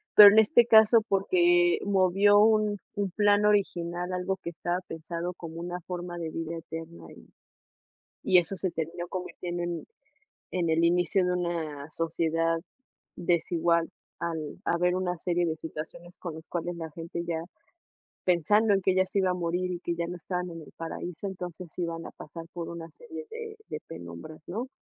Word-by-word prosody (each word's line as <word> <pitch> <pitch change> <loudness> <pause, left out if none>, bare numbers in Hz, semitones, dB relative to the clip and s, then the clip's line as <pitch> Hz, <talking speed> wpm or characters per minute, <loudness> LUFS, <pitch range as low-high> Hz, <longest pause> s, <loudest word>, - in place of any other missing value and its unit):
Pero 205 -1 +13
en 220 - +7
este 235 +2 +6
caso 220 0 +7
porque 175 -3 +4
movió 200 +1 +5
un 215 -1 +4 0.2
un 200 -2 0
plan 205 +1 +4
original, 180 -4 +1
algo 180 +1 -1
que 170 - -6
estaba 175 +2 -2
pensado 170 +2 -4
como 165 -2 -8
una 175 +1 -4
forma 175 -1 -5
de 165 -2 -3
vida 165 +1 -4
eterna, 165 +1 -8
y - - -15 1.0
y 185 - +5
eso 175 +3 0
se 185 - -1
terminó 170 +2 -4
convirtiendo 175 -1 -4
en 175 -1 -3 0.7
en 175 -2 0
el 160 +1 +3
inicio 175 +2 +3
de 180 - +1
una 160 -5 -3
sociedad 165 0 0 0.6
desigual, 170 -1 +1 0.3
al 160 -3 -3
haber 180 +1 +2
una 180 -1 -1
serie 175 +1 0
de 160 -2 0
situaciones 165 +2 -7
con 170 -4 -6
las 160 0 -10
cuales 175 0 -3
la 160 -2 -6
gente 170 +2 -5
ya 165 -1 -2 0.8
pensando 205 +5 +4
en 195 - +2
que 190 0 +3
ya 185 0 +3
se 200 - -1
iba 190 -1 +2
a 180 - +1
morir 180 +1 -1
y 175 - -4
que 170 - -2
ya 170 0 -1
no 175 - -5
estaban 180 +1 -3
en 165 -1 -7
el 155 - -12
paraíso, 165 +2 -5
entonces 180 -2 -6
iban 165 -1 -3
a - - -7
pasar 165 +2 -9
por 170 -1 -5
una 165 -1 -7
serie 475 -1 -9
de 450 -1 -7
de - - -5
penumbras, 85 - -9
¿no? 230 +8 -4
175 Hz, 175 wpm, -28 LUFS, 165-185 Hz, 1.0 s, Pero